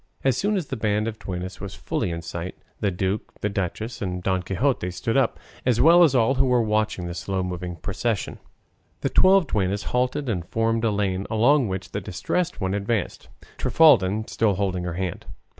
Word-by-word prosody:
As 135 Hz, -3 st, +3 dB
soon 205 Hz, +8 st, +1 dB
as 180 Hz, -, -2 dB
the 135 Hz, -, -2 dB
band 105 Hz, -1 st, 0 dB
of 110 Hz, -1 st, -5 dB
duennas 90 Hz, 0 st, -6 dB
was 100 Hz, -1 st, -6 dB
fully -, -, -2 dB
in 85 Hz, 0 st, -4 dB
sight, 85 Hz, +2 st, -5 dB, 0.2 s
the 105 Hz, -, +1 dB
duke, 95 Hz, +3 st, -3 dB
the 105 Hz, -, 0 dB
duchess, 105 Hz, +4 st, -4 dB
and 90 Hz, -2 st, -3 dB
Don 95 Hz, -1 st, +1 dB
Quixote 95 Hz, +1 st, 0 dB
stood 115 Hz, +6 st, -2 dB
up, 135 Hz, -, +2 dB, 0.2 s
as 120 Hz, -2 st, +2 dB
well 170 Hz, +3 st, +7 dB
as 145 Hz, -5 st, +4 dB
all 120 Hz, +1 st, +4 dB
who 135 Hz, 0 st, +2 dB
were 125 Hz, -1 st, +3 dB
watching 110 Hz, -4 st, 0 dB
the 85 Hz, -, -4 dB
slow 95 Hz, +2 st, -2 dB
moving 90 Hz, -1 st, -4 dB
procession. 100 Hz, +5 st, -3 dB, 0.6 s
The -, -, 0 dB
twelve 190 Hz, -1 st, +5 dB
duennas 100 Hz, -5 st, -1 dB
halted 125 Hz, +3 st, 0 dB
and 95 Hz, -8 st, -1 dB
formed 115 Hz, 0 st, 0 dB
a 115 Hz, -, +3 dB
lane, 100 Hz, -2 st, -1 dB
along 125 Hz, +4 st, +3 dB
which 95 Hz, -1 st, -5 dB
the 100 Hz, -, -3 dB
Distressed 165 Hz, -, -2 dB
One 95 Hz, -1 st, -1 dB
advanced, 100 Hz, 0 st, -2 dB, 0.3 s
Trifaldin 110 Hz, -10 st, +4 dB
still 105 Hz, -4 st, +1 dB
holding 90 Hz, -2 st, -1 dB
her 90 Hz, -, -3 dB
hand. 90 Hz, 0 st, -4 dB
105 Hz, 190 wpm, -24 LUFS, 95-120 Hz, 0.6 s, well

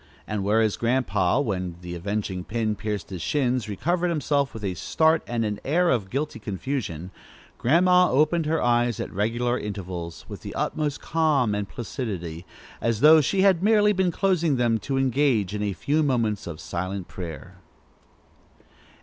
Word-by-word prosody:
And 105 Hz, -2 st, -3 dB
whereas 110 Hz, +1 st, +2 dB
Grandpa, 115 Hz, -5 st, +1 dB
when 95 Hz, -8 st, -2 dB
the 90 Hz, 0 st, -7 dB
avenging 95 Hz, +1 st, -3 dB
pin 110 Hz, +2 st, -1 dB
pierced 105 Hz, -4 st, -4 dB
his 90 Hz, -3 st, -5 dB
shins, 125 Hz, -, 0 dB
recovered 175 Hz, -, 0 dB
himself 145 Hz, -3 st, 0 dB
with 110 Hz, -, -9 dB
a 95 Hz, -2 st, -1 dB
start 160 Hz, -, +2 dB
and 115 Hz, -2 st, -1 dB
an 105 Hz, -1 st, -3 dB
air 175 Hz, +5 st, +2 dB
of 105 Hz, -6 st, 0 dB
guilty 140 Hz, -1 st, -3 dB
confusion, 95 Hz, -, -4 dB, 0.5 s
Grandma 180 Hz, +6 st, +4 dB
opened 155 Hz, +3 st, +2 dB
her 160 Hz, +1 st, +1 dB
eyes 120 Hz, -1 st, +2 dB
at -, -, -5 dB
regular 120 Hz, +5 st, 0 dB
intervals, 90 Hz, -5 st, -6 dB
with -, -, -8 dB
the -, -, -8 dB
utmost 150 Hz, -2 st, -2 dB
calm 150 Hz, -9 st, +1 dB
and 105 Hz, -1 st, -3 dB
placidity, 95 Hz, -9 st, -5 dB, 0.3 s
as 115 Hz, -2 st, 0 dB
though 155 Hz, +1 st, +8 dB
she 190 Hz, +7 st, +1 dB
had 190 Hz, -4 st, +4 dB
merely 210 Hz, 0 st, +4 dB
been 190 Hz, -2 st, +1 dB
closing 170 Hz, -5 st, +1 dB
them 120 Hz, -2 st, +1 dB
to 135 Hz, +3 st, -2 dB
engage 130 Hz, -7 st, +1 dB
in 105 Hz, -, -3 dB
a 105 Hz, -1 st, 0 dB
few 145 Hz, -, 0 dB
moments 115 Hz, -, 0 dB
of 80 Hz, -3 st, -6 dB
silent 95 Hz, +1 st, -4 dB
prayer. 90 Hz, 0 st, -8 dB
115 Hz, 160 wpm, -25 LUFS, 100-150 Hz, 0.5 s, though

